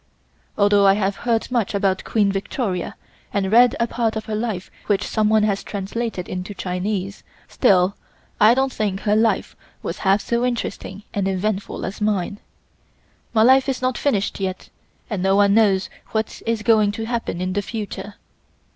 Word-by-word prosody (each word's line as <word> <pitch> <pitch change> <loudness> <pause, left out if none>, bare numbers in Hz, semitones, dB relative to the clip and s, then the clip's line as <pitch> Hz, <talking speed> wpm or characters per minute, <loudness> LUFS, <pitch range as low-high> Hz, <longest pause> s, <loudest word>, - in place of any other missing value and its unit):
Although 205 -1 +4
I 195 - +6
have 200 -1 0
heard 235 0 -1
much 230 -5 0
about 195 -2 +1
Queen 205 -3 +2
Victoria 195 -1 -3 0.4
and 195 -1 -1
read 240 +1 +6
a 230 - +3
part 230 -1 -1
of 220 - -4
her 220 - -5
life 215 -4 -3 0.2
which 205 -2 +1
someone 215 0 +2
has 200 -2 0
translated 205 -1 -4
into 185 +3 -5
Chinese, 190 +2 -3 0.3
still 195 -5 +3 0.4
I 215 +3 +6
don't 265 0 +1
think 200 -2 -2
her 210 0 +2
life 220 +1 +1 0.3
was - - -4
half 195 +1 +3
so 235 +1 -1
interesting 225 -4 -3
and 200 -2 0
eventful 195 +1 -2
as 195 +3 -6
mine. 205 -1 -1 0.9
My 220 -1 +4
life 260 +3 +5
is 265 - -1
not 255 -1 0
finished 210 -10 0
yet 190 -1 -4 0.4
and 205 -5 -3
no 195 +1 +3
one 200 0 +4
knows 200 -3 +3 0.3
what 220 0 -2
is 230 -2 0
going 215 -2 +4
to 225 +2 -4
happen 230 -6 -3
in 185 0 -2
the 205 - 0
future. 210 -1 -6
205 Hz, 170 wpm, -21 LUFS, 195-225 Hz, 0.9 s, I